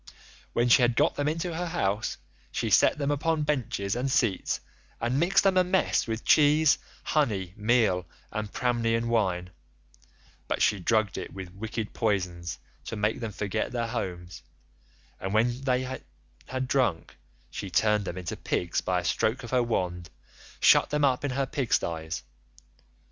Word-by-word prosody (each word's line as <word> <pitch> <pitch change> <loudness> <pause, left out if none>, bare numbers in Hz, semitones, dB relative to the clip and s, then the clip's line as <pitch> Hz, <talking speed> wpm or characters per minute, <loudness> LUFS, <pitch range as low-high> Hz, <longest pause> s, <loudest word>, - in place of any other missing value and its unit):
When 120 +1 +2
she 120 +2 +6
had 120 -1 +3
got - - +3
them 145 - -1
into 165 +3 -1
her 175 +1 -2
house, 110 - -1 0.3
she - - -2
set - - +5
them 145 -1 0
upon 155 +2 0
benches 120 -8 -1
and 125 +3 -1
seats 120 -7 +1 0.4
and 120 +4 0
mixed 175 +5 +3
them 195 -1 +3
a 185 - +6
mess 180 -6 +1
with 115 0 -4
cheese, 150 0 +5 0.2
honey, 100 - 0
meal, 105 -5 +2 0.2
and 105 -1 -4
Pramnian 115 -1 0
wine, 90 -6 0 1.0
but - - -1
she 105 - +3
drugged 110 +2 +1
it - - -7
with 95 -2 -8
wicked 110 +2 -5
poisons 90 -6 -1 0.3
to - - -5
make 105 +3 0
them 115 -3 -4
forget 100 +2 -2
their 120 -2 -1
homes, 90 -3 -5 0.8
and 95 +2 -3
when 120 +3 +2
they 130 -1 +1 0.6
had 130 0 -3
drunk 120 - 0 0.4
she 100 - -5
turned 105 +3 +2
them 90 - -5
into 90 -2 -4
pigs 85 - -1
by 90 -1 0
a - - -9
stroke 125 +4 0
of 120 - -8
her 125 -1 +3
wand, 90 -7 -2 0.5
and - - -3
shut - - +6
them 150 -1 +2
up 130 -1 +1
in 145 - 0
her 135 +1 0
pig 135 -3 -3
styes. 80 -1 -1
115 Hz, 165 wpm, -27 LUFS, 95-135 Hz, 1.0 s, she